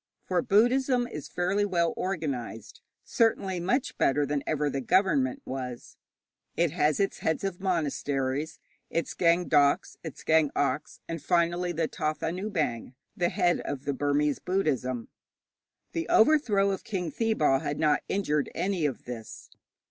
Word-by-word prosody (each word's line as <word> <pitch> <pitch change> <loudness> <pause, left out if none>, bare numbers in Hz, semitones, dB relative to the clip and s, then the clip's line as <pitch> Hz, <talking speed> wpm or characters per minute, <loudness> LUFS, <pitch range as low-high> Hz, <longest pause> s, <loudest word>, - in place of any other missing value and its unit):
For 180 -2 0
Buddhism 245 +5 +3
is 155 - -7
fairly 185 +3 0
well 170 -4 +1
organized 135 - -4 0.2
certainly 195 -5 +1
much 205 +10 0
better 145 +2 +3
than 145 0 -1
ever 150 -1 0
the 140 -1 -2
government 150 -5 +2
was. 125 -2 -6 0.6
It 170 -2 +2
has 150 -2 +1
its 195 - 0
heads 160 +3 -1
of 195 -2 -3
monasteries, 145 -4 -1 0.3
its 165 - -2
Gaing 170 +1 +2
dauks, 145 -2 +3
its 160 -4 -8
Gaing 160 -2 +4
oks, 145 +2 -1
and 165 -2 -5
finally 175 +2 +1
the 165 -1 -1
Thathanabaing, 155 - -2 0.2
the 175 -1 +1
head 180 -2 +2
of 140 0 -5
the 140 - 0
Burmese 145 +1 +1
Buddhism. 130 -10 -1 0.8
The 165 -1 -3
overthrow 220 -7 +4
of 195 - -4
King 185 -7 -3
Thibaw 155 - +2
had 145 - -3
not 150 -2 +2
injured 150 -7 0
any 185 -5 0
of 135 - -6
this. 115 -3 -8
165 Hz, 140 wpm, -28 LUFS, 145-190 Hz, 0.8 s, Gaing